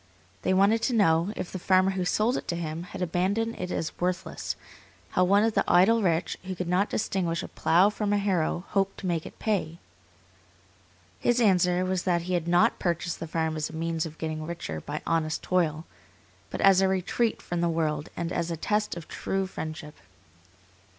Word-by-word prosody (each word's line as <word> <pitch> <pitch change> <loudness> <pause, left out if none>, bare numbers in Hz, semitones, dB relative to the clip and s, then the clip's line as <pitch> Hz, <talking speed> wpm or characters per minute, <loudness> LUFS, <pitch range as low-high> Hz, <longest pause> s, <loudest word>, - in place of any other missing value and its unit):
They - - 0
wanted 200 +4 +4
to 245 +1 +1
know, 170 -3 +3
if 175 - -5
the 185 - -5
farmer 185 +1 +3
who 185 -1 -2
sold 215 +7 +2
it - - -4
to 170 - -1
him 165 -1 -4
had 180 - -5
abandoned 195 +7 0
it 180 - -3
as 160 - -3
worthless, 180 0 -2 0.6
how 180 - +3
one 200 +3 +4
of 225 0 +2
the - - +2
idle 220 +6 +5
rich, 170 -3 0
who 185 0 -5
could 180 0 -4
not 185 +4 +2
distinguish 180 -6 -1
a - - -5
plough 185 +5 +3
from 210 -1 -2
a 205 - +3
harrow, 185 -4 0
hoped 195 -1 0
to - - -6
make 170 -3 -1
it - - -13
pay? 180 -7 -1 1.4
His 240 0 +2
answer 180 -4 +3
was 185 -1 0
that 175 -2 +1
he 185 +1 -3
had 170 -2 0
not 175 +1 +3
purchased 170 -1 -1
the 165 - -5
farm 160 0 -1
as 155 -1 -2
a - - -11
means 165 0 -2
of 160 0 -12
getting 155 -1 -4
richer 155 - -5
by 150 +1 -5
honest 160 -1 0
toil, 165 -3 0 0.6
but - - -4
as 195 -1 +6
a 190 - +4
retreat 190 +5 0
from 175 -1 -3
the 170 - +2
world 155 -2 -1
and 170 +1 -2
as 170 - -1
a 165 - -3
test 210 +2 -1
of 170 - -8
true 195 0 -2
friendship. 155 -4 -6
180 Hz, 200 wpm, -27 LUFS, 165-195 Hz, 1.4 s, as